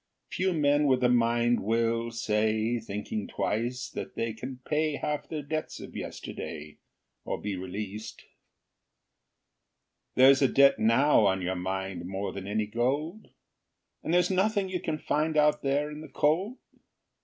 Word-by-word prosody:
Few 190 +1 0
men 145 -2 +3
with 130 -2 +2
a 125 - +5
mind 120 0 +3
will 115 +2 0
say, 110 0 0
Thinking 105 -1 -5
twice, 120 +4 -2
that - - -6
they 115 -1 -2
can 125 +3 -7
pay 155 0 +1
Half 150 +1 -3
their 155 -2 -4
debts 155 +2 -4
of - - -10
yesterday, 75 0 -7 0.4
Or - - -3
be 105 -1 -3
released. 100 +3 -6 1.9
There's 130 +1 +7
a 135 - +6
debt 140 +1 +5
now 115 0 +4
on 95 -1 0
your 90 +1 -1
mind 95 -1 -4
More 95 +2 -4
than 95 0 -7
any 105 +1 0
gold? 140 - -2 0.7
And - - -3
there's 180 +1 +3
nothing 195 +1 +1
you 185 -1 -2
can 160 -3 -2
find 155 +1 0
Out 150 0 +4
there 145 +2 0
in 150 0 -8
the 155 - -10
cold? 185 - +1
120 Hz, 150 wpm, -28 LUFS, 105-150 Hz, 1.9 s, There's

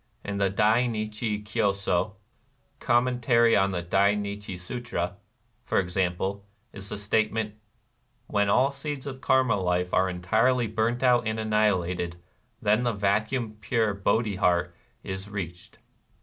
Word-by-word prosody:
In 100 0 -3
the 100 -1 +2
Dai 110 +5 +3
Nichi 110 -1 -3
Kyo 105 -1 +1
So 100 0 -1 0.6
(Com 120 0 +3
mentary 120 -2 +3
on 95 0 +3
the 90 -2 -3
Dai 100 +4 +3
Nichi 100 -2 -5
Sutra), 90 -2 -4 0.5
for - - -1
example, 95 +2 -1 0.3
is 100 0 -8
the - - -4
state 105 +1 +1
ment: 110 -1 -2 0.3
— - - -44
" - - -42
When 100 0 +3
all 130 +7 +4
seeds 140 0 -6
of 130 -2 -7
Karma 130 -5 +3
life 90 -1 0
are 95 0 +3
entirely 110 +8 +2
burnt 110 +3 -1
out 120 -3 +4
and 110 0 -1
annihilated, 95 -5 0 0.4
then 110 +1 +2
the 120 -1 0
vacuum 105 +3 0
pure 110 -3 +1
Bodhi 100 +1 0
heart 85 -2 +1 0.3
is 95 +1 -6
reached." 90 -4 -7
105 Hz, 150 wpm, -27 LUFS, 95-115 Hz, 0.6 s, all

